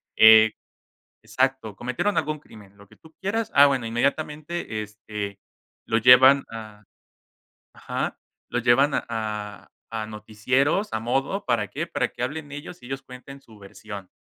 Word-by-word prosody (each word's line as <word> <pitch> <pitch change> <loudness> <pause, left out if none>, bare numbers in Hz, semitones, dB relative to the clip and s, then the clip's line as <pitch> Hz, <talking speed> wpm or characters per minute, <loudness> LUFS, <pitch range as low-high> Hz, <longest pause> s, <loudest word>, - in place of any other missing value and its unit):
Eh, 110 0 +8 0.7
exacto, 130 -5 -1
cometieron 125 - -1
algún 155 0 -2
crimen, 105 -8 -16
lo 100 0 -17
que - - -21
tú 160 0 -20
quieras. 210 +3 -2
Ah, 140 - +8
bueno, 135 -5 +1
inmediatamente, 150 +1 -2
este, 105 -1 -7 0.5
lo 115 - +1
llevan 125 +4 +7
a 110 -2 -10 0.9
ajá, - - -4 0.3
lo 125 - -1
llevan 125 +4 +4
a 105 -3 -4 0.2
a 110 -1 -4
noticieros, 110 - -1
a - - 0
modo, 135 - -1
¿para 115 -4 0
qué? - - -4
Para - - -1
que 125 - -4
hablen 145 +2 -6
ellos 145 +3 -9
y 125 - -11
ellos 135 +1 -5
cuenten 135 +2 -12
su 110 -5 -18
versión, 100 0 -10
120 Hz, 145 wpm, -24 LUFS, 110-140 Hz, 0.9 s, Eh